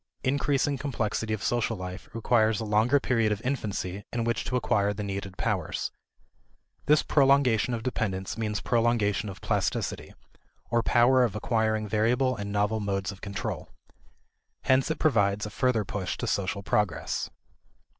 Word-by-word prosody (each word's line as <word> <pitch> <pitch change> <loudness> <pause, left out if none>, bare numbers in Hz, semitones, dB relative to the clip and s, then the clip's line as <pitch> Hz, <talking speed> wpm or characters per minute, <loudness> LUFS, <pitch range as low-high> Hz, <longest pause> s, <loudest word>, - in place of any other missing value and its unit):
Increasing 140 +1 +1
complexity 110 -5 -2
of 110 -2 -2
social 120 -2 0
life 90 +1 -7
requires 110 -1 +2
a 110 - -3
longer 110 +6 +3
period 115 -5 +1
of 105 - -1
infancy 100 -7 -2
in 120 -1 -1
which 115 0 0
to 125 - -2
acquire 105 -4 +1
the 105 - -4
needed 100 -1 -5
powers; - - -2 1.0
this 150 +1 +5
prolongation 135 -5 +3
of 110 - -6
dependence 100 -6 -2
means 105 -3 -2
prolongation 115 -2 +1
of 95 - -9
plasticity, - - -2 0.6
or 120 0 +3
power 125 +3 +4
of 110 -5 0
acquiring 110 -1 0
variable 120 +5 +2
and 100 -2 -5
novel 105 +2 +1
modes 100 -2 -2
of 100 - -13
control. 100 -1 -4 0.9
Hence 130 +2 +3
it 160 - -1
provides 105 -8 +2
a 105 - -6
further 120 -3 +1
push 95 -1 -3
to - - -3
social 100 0 -1
progress. 105 0 -1
110 Hz, 150 wpm, -27 LUFS, 100-125 Hz, 1.0 s, this